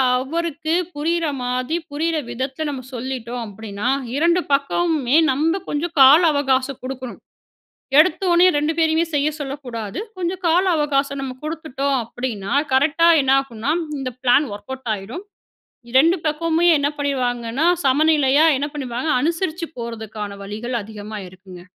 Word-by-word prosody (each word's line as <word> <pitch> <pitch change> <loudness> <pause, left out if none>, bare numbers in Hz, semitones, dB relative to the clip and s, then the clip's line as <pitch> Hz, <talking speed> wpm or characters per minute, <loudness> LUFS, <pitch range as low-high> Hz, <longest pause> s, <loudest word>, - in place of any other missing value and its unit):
அவருக்கு 315 +4 -2 0.2
புரியிற 330 +3 0 0.2
மாதிரி, 250 +5 -1
புரியிற 320 +3 -1
விதத்துல 265 +5 -3
நம்ம 270 -3 -5
சொல்லிட்டோம் 245 -1 -5
அப்படீன்னா, 205 +1 -6 0.3
2 340 +4 +3
பக்கமுமே 280 -1 +1 0.2
நம்ம 320 +7 +1
கொஞ்சம் 315 +3 -3
கால 275 +5 +9
அவகாசம் 270 -2 0
குடுக்கணும். 255 -1 -6 0.8
எடுத்தொன்னே 345 +2 +4
2 295 +2 +1
பேரையுமே 320 0 +3
செய்ய 290 +1 +2
சொல்லக்கூடாது. 255 -7 -5 0.2
கொஞ்சம் 365 +1 -3
கால 340 +3 +3
அவகாசம் 280 -2 0
நம்ம 260 -1 -5
குடுத்துட்டோம் 280 -3 -2
அப்படீன்னா, 225 -4 -5 0.2
கரெக்டா 305 +5 +4
என்ன 265 0 +2
ஆகும்னா 270 +1 -3 0.3
இந்த 265 -2 -3
ப்ளான் 260 +4 +4
ஒர்க் 205 +4 -12
அவுட் 265 -2 -7
ஆயிரும். 215 - -8 0.7
2 320 +8 +4
பக்கமுமே 330 +2 +1
என்ன 285 0 +1
பண்ணீருவாங்கன்னா, 255 0 -1 0.2
சமநிலையா 290 +1 +4
என்ன 285 +2 -2
பண்ணீருவாங்க 265 +1 -3
அனுசரிச்சு 330 +1 -1
போறதுக்கான 220 -3 -6
வழிகள் 220 +5 -5
அதிகமா 210 0 -8
இருக்குங்க. 185 -1 -13
275 Hz, 125 wpm, -21 LUFS, 245-315 Hz, 0.8 s, கால